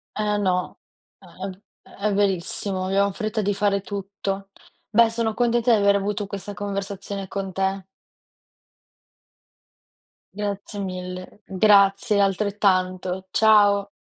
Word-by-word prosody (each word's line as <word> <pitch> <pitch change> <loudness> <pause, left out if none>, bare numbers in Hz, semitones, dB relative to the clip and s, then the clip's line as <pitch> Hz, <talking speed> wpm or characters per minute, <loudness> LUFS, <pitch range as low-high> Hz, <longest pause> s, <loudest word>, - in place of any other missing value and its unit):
Eh, 210 -1 0
no, 180 -2 -1 0.4
è - - -18 0.2
v 190 +2 -12 0.3
è 205 +1 -2
verissimo, 195 -1 0
abbiamo 200 +1 +2
fretta 215 +1 -2
di 205 0 0
fare 200 0 +1
tutto. 195 0 -5 0.4
Beh, 225 +2 +5
sono 225 -1 -1
contenta 240 +1 +2
di - - +5
aver 200 0 +4
avuto 205 +1 -2
questa 200 +1 -6
conversazione 200 -1 -5
con 195 -1 -4
te. 190 0 -1 2.5
Grazie 205 0 -4
mille. 185 +1 -7
Grazie, 200 +1 +4
altrettanto, 190 -2 0
ciao. 205 -2 +4
200 Hz, 110 wpm, -23 LUFS, 195-210 Hz, 2.5 s, Beh